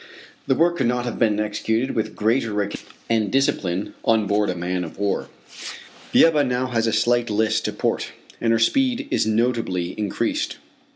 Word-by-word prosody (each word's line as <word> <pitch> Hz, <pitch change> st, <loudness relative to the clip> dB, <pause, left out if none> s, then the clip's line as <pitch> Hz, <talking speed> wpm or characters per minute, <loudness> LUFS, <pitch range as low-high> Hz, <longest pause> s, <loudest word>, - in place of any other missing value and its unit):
The 135 Hz, -, +3 dB
work 170 Hz, +3 st, +2 dB
could 130 Hz, -, +1 dB
not 125 Hz, 0 st, 0 dB
have 120 Hz, -, -4 dB
been 105 Hz, -3 st, +2 dB
executed 110 Hz, +3 st, -1 dB
with 110 Hz, -1 st, -2 dB
greater 115 Hz, +1 st, +1 dB
regularity 105 Hz, -1 st, -2 dB, 0.3 s
and 110 Hz, -3 st, +1 dB
discipline 100 Hz, -8 st, 0 dB
on 110 Hz, -3 st, +3 dB
board 105 Hz, +1 st, +1 dB
a 90 Hz, -, -1 dB
man 90 Hz, +1 st, -2 dB
of 80 Hz, -, -9 dB
war. 100 Hz, 0 st, -1 dB, 0.8 s
The -, -, +7 dB
Ebba 155 Hz, -3 st, +3 dB
now 125 Hz, -1 st, 0 dB
has 115 Hz, -3 st, 0 dB
a -, -, +2 dB
slight 120 Hz, +2 st, +2 dB
list 110 Hz, +1 st, +1 dB
to -, -, 0 dB
port, -, -, -2 dB, 0.3 s
and 115 Hz, -, +2 dB
her 115 Hz, -, +4 dB
speed 260 Hz, -, +1 dB
is -, -, +1 dB
notably 110 Hz, -6 st, 0 dB
increased. 105 Hz, -2 st, -1 dB
115 Hz, 180 wpm, -22 LUFS, 105-125 Hz, 0.8 s, The